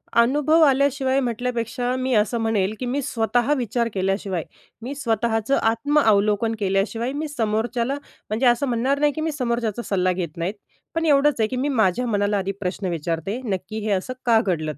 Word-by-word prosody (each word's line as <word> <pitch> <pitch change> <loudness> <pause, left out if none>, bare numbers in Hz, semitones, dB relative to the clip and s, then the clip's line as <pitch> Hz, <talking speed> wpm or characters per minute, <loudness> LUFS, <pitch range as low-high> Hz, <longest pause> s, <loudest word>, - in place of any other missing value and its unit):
अनुभव 295 +7 +4
आल्याशिवाय 275 -1 +3
म्हटल्यापेक्षा, 245 0 -2
मी 260 0 -1
असं 215 +2 +2
म्हणेल 215 -3 +1
की 255 - -3
मी 260 +4 -1
स्वतः 240 +1 0
विचार 235 -1 -1
केल्याशिवाय, 195 -2 -1 0.4
मी 260 +4 -5
स्वतःचं 230 -1 0
आत्मअवलोकन 225 -3 +2
केल्याशिवाय 205 +5 0
मी 305 +2 -3
समोरच्याला 235 0 -1 0.3
म्हणजे 220 +5 0
असं 240 +3 +3
म्हणणार 255 +4 0
नाही, 295 0 +3
की 315 - -4
मी 320 0 -1
समोरच्याचा 235 -5 -2
सल्ला 185 -2 +1
घेत 170 -3 -4
नाही. 170 +4 -2 0.4
पण 330 0 0
एवढंच 290 -2 +3
आहे 220 - +3
की 255 - -4
मी 265 +3 -1
माझ्या 225 -2 +2
मनाला 205 -2 +1
आधी 195 0 -1
प्रश्न 185 0 -3
विचारते, 170 +6 -3
नक्की 200 +1 -3
हे 215 - 0
असं 195 +6 -1
का 230 -2 +5
घडलं? 155 - -2
230 Hz, 170 wpm, -23 LUFS, 205-260 Hz, 0.4 s, का